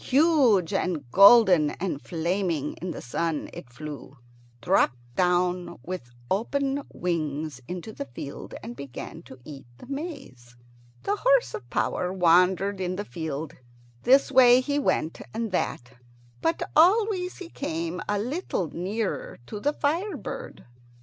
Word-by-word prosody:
Huge 265 Hz, -, +4 dB
and 170 Hz, -8 st, -1 dB
golden 195 Hz, -, +7 dB
and 175 Hz, -6 st, -2 dB
flaming 170 Hz, -3 st, -1 dB
in 180 Hz, -, -3 dB
the -, -, -6 dB
sun, 155 Hz, +5 st, -2 dB
it 125 Hz, -, -9 dB
flew, 140 Hz, +1 st, -9 dB, 0.4 s
dropped 125 Hz, +1 st, +2 dB, 0.2 s
down 180 Hz, 0 st, +1 dB
with 180 Hz, -7 st, -6 dB, 0.2 s
open 275 Hz, +7 st, 0 dB
wings 155 Hz, -5 st, -3 dB
into 180 Hz, +4 st, -6 dB
the 140 Hz, -, -5 dB
field, 140 Hz, +4 st, -8 dB
and 235 Hz, +2 st, -7 dB
began 140 Hz, +4 st, -8 dB
to 130 Hz, -, -13 dB
eat 140 Hz, -5 st, -10 dB
the -, -, -12 dB
maize. 250 Hz, -, -7 dB, 0.5 s
The 410 Hz, -, 0 dB
horse -, -, +3 dB
of 445 Hz, -, -7 dB
power 180 Hz, -, -1 dB
wandered 185 Hz, +2 st, +3 dB
in 180 Hz, 0 st, -1 dB
the 205 Hz, +2 st, -4 dB
field. 160 Hz, -4 st, -5 dB, 0.5 s
This 270 Hz, +2 st, +4 dB
way 250 Hz, -2 st, +7 dB
he 285 Hz, +2 st, -1 dB
went, 165 Hz, -, 0 dB
and 225 Hz, -2 st, -2 dB
that, 125 Hz, -8 st, -2 dB, 0.5 s
but 165 Hz, -, 0 dB
always 370 Hz, +2 st, +4 dB
he 360 Hz, -3 st, -9 dB
came 165 Hz, -, -3 dB
a 205 Hz, -, +1 dB
little 225 Hz, -, -2 dB
nearer 200 Hz, +5 st, -3 dB
to 210 Hz, -, -6 dB
the 290 Hz, +7 st, +1 dB
fire 330 Hz, +8 st, -1 dB
bird. -, -, -7 dB
185 Hz, 140 wpm, -26 LUFS, 160-260 Hz, 0.5 s, golden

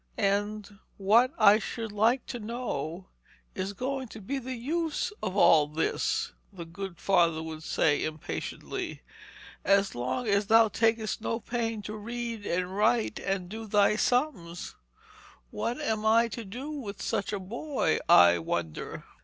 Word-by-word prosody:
'And 205 Hz, 0 st, -1 dB, 0.2 s
what, 225 Hz, +6 st, +4 dB
I 205 Hz, +2 st, +7 dB
should 225 Hz, +1 st, -5 dB
like 225 Hz, +5 st, +2 dB
to 245 Hz, -, -5 dB
know, 195 Hz, -, -4 dB, 0.4 s
is 190 Hz, +1 st, -3 dB
going 265 Hz, +4 st, -3 dB
to 220 Hz, -, -10 dB
be 270 Hz, +7 st, -3 dB
the 260 Hz, 0 st, -5 dB
use 320 Hz, -, -2 dB
of 190 Hz, +2 st, -3 dB
all 155 Hz, -6 st, +6 dB
this,' 155 Hz, +2 st, -1 dB, 0.2 s
the 175 Hz, -4 st, -8 dB
good 180 Hz, +2 st, -7 dB
father 170 Hz, -3 st, +2 dB
would 160 Hz, -1 st, -7 dB
say 145 Hz, -2 st, +1 dB
impatiently, 155 Hz, -1 st, -5 dB, 0.6 s
'as 195 Hz, 0 st, +3 dB
long 130 Hz, -, -2 dB
as 200 Hz, 0 st, +2 dB
thou 225 Hz, 0 st, +6 dB
takest 225 Hz, 0 st, +1 dB
no 230 Hz, +1 st, -2 dB
pains 225 Hz, -3 st, -3 dB
to 215 Hz, -, -5 dB
read 230 Hz, 0 st, -5 dB
and 180 Hz, +2 st, -1 dB
write 220 Hz, +2 st, +2 dB
and 195 Hz, -2 st, -2 dB
do 220 Hz, +3 st, -7 dB
thy 205 Hz, 0 st, +4 dB
sums? 230 Hz, -, -1 dB, 0.8 s
What 240 Hz, +2 st, -2 dB
am 220 Hz, -1 st, -1 dB
I 230 Hz, +2 st, +4 dB
to 235 Hz, -1 st, -6 dB
do 250 Hz, +10 st, -6 dB
with 220 Hz, -9 st, -6 dB
such 200 Hz, -, -2 dB
a 205 Hz, -, -2 dB
boy, 235 Hz, -, -1 dB
I 85 Hz, 0 st, +7 dB
wonder?' 80 Hz, -1 st, -4 dB
210 Hz, 150 wpm, -29 LUFS, 185-235 Hz, 0.8 s, I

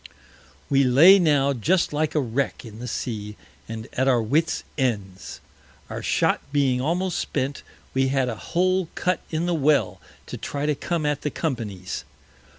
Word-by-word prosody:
We 140 Hz, 0 st, +3 dB
lay 155 Hz, +10 st, +7 dB
now 145 Hz, -5 st, +3 dB
just 165 Hz, -, +1 dB
like 155 Hz, +1 st, -1 dB
a -, -, +4 dB
Wreck 130 Hz, 0 st, -2 dB
in 110 Hz, -1 st, -10 dB
the 125 Hz, -, -6 dB
Sea, 105 Hz, -3 st, -4 dB, 0.3 s
and 110 Hz, 0 st, -6 dB
at 130 Hz, +1 st, +1 dB
our 125 Hz, -3 st, +4 dB
Wits 150 Hz, +9 st, 0 dB
Ends. 100 Hz, -9 st, -3 dB, 0.5 s
Our -, -, -4 dB
Shot -, -, +1 dB
being 135 Hz, -3 st, +2 dB
almost 175 Hz, +5 st, 0 dB
spent, 140 Hz, 0 st, -2 dB, 0.3 s
we 135 Hz, 0 st, +2 dB
had 135 Hz, -1 st, +1 dB
a 120 Hz, -, -2 dB
Hole 185 Hz, -, 0 dB
cut 180 Hz, 0 st, 0 dB
in 160 Hz, +1 st, -1 dB
the 175 Hz, -, 0 dB
Well 135 Hz, -, +2 dB, 0.2 s
to -, -, -7 dB
try 145 Hz, 0 st, -4 dB
to 150 Hz, -, +2 dB
come 165 Hz, +2 st, -2 dB
at 150 Hz, -1 st, 0 dB
the 150 Hz, -, -1 dB
Company's. 105 Hz, -, -4 dB
135 Hz, 165 wpm, -24 LUFS, 120-155 Hz, 0.5 s, lay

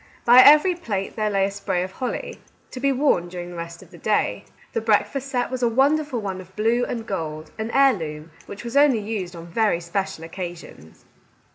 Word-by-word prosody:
By 245 Hz, +1 st, +8 dB
every 305 Hz, +7 st, +7 dB
plate 210 Hz, -, -4 dB
there 215 Hz, -1 st, 0 dB
lay 195 Hz, -1 st, +2 dB
a 200 Hz, -, -2 dB
spray 195 Hz, -2 st, -2 dB
of 185 Hz, -, -6 dB
holly, 250 Hz, +6 st, -5 dB, 0.3 s
to 255 Hz, -, -7 dB
be 275 Hz, +1 st, +2 dB
worn 260 Hz, -10 st, +2 dB
during 175 Hz, 0 st, -7 dB
the -, -, -9 dB
rest 170 Hz, 0 st, -7 dB
of -, -, -20 dB
the -, -, -14 dB
day. -, -, 0 dB, 0.3 s
The -, -, -1 dB
breakfast 225 Hz, +5 st, +1 dB
set 245 Hz, -2 st, -1 dB
was 255 Hz, -1 st, -3 dB
a 240 Hz, -, +3 dB
wonderful 275 Hz, +2 st, +2 dB
one 190 Hz, -3 st, -4 dB
of 185 Hz, +1 st, -17 dB
blue 230 Hz, +3 st, +1 dB
and 230 Hz, -2 st, -4 dB
gold, 155 Hz, -6 st, -5 dB
an 220 Hz, +1 st, -3 dB
heirloom, 165 Hz, -, +1 dB, 0.2 s
which 200 Hz, -, -8 dB
was 235 Hz, +2 st, -6 dB
only 285 Hz, -4 st, +5 dB
used 205 Hz, -4 st, -4 dB
on 165 Hz, 0 st, -9 dB
very 195 Hz, +1 st, +1 dB
special 170 Hz, -1 st, -4 dB
occasions. 170 Hz, -, -9 dB
210 Hz, 205 wpm, -23 LUFS, 175-250 Hz, 0.3 s, By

